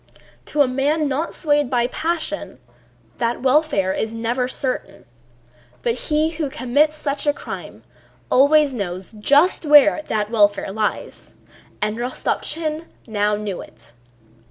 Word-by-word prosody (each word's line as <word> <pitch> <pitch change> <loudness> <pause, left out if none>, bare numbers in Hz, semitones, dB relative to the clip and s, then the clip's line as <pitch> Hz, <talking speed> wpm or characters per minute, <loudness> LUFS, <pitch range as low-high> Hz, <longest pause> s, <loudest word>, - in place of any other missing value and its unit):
To 295 -1 +2
a - - 0
man 290 +4 0
not 285 +5 -2
swayed 295 -4 +1
by 245 -2 +2
passion 310 - -3 0.6
that 235 +1 -1
welfare 265 -9 +2
is 220 +3 -3
never 240 +2 -1
certain, 260 0 -4 0.8
but 235 - +1 0.2
he 310 +1 +2
who 315 -4 -3
commits 285 +5 +1
such 290 -1 -3
a 290 - +4
crime - - -8 0.5
always 285 +1 +5
knows 185 -5 -5
just 285 - +3
where 300 0 +6
that 210 0 -1
welfare 205 -3 +2
lies. 210 +1 -4 0.5
And 210 +1 -1
Rostopchín 305 +6 -3 0.2
now 210 -2 0
knew 205 -3 -4
it. 115 +1 -14
260 Hz, 130 wpm, -21 LUFS, 220-300 Hz, 0.8 s, where